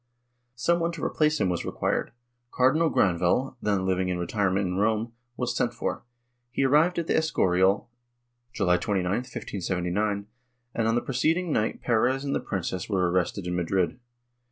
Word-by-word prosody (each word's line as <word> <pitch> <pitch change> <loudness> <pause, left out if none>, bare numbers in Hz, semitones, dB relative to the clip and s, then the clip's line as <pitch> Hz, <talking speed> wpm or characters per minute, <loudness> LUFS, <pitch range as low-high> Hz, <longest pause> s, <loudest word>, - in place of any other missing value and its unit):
Some 170 +8 +1
one 170 0 0
to 165 - -7
replace 155 -1 +1
him - - +2
was 90 -2 -1
required; - - -1 0.4
Cardinal 155 +7 +3
Granvelle, 90 - +1
then 100 -3 0
living 95 -1 0
in 90 - -1
retirement 95 +2 0
in 90 0 -2
Rome, 110 +2 0 0.2
was 125 -1 -1
sent 120 -1 0
for; - - -3 0.5
he 135 - -1
arrived 155 +6 +4
at 170 - 0
the - - 0
Escorial, 95 - +2 0.6
July 90 -6 +2
29, 95 -4 -1
1579, 100 -3 -2 0.5
and, 115 -1 0
on 115 - +2
the 120 - +2
preceding 160 +7 0
night 110 -5 -1
Perez 125 +3 +2
and 140 - -1
the - - +1
princess 95 -2 -4
were 90 -4 +1
arrested 90 +1 0
in 90 0 -2
Madrid. 90 +4 0
105 Hz, 160 wpm, -26 LUFS, 90-130 Hz, 0.6 s, arrived